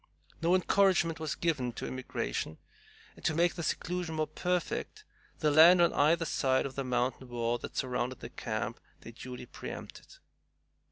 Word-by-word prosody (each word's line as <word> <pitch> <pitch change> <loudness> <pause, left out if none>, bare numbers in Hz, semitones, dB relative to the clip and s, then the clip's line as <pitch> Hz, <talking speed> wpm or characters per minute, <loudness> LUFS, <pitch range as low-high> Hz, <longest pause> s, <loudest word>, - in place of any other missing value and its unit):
No 170 +2 +4
encouragement 185 -3 +3
was 155 -2 -2
given 140 -8 -1
to - - -5
immigration, 80 - -3 0.6
and, - - -17
to 155 - +1
make 170 +1 +3
their 170 - -5
seclusion 175 +1 -2
more 155 0 +1
perfect, 180 +1 -2 0.3
the 150 - +2
land 165 +4 +8
on 170 - +4
either 165 +3 +3
side 130 -4 +1
of 135 - -5
the 135 - -3
mountain 125 0 -1
wall 120 0 -1
that - - -8
surrounded 125 -1 -1
the 115 - -8
camp 115 +1 -3 0.2
they 115 - -10
duly 125 +1 -8
preempted. - - -9
145 Hz, 160 wpm, -31 LUFS, 125-170 Hz, 0.6 s, land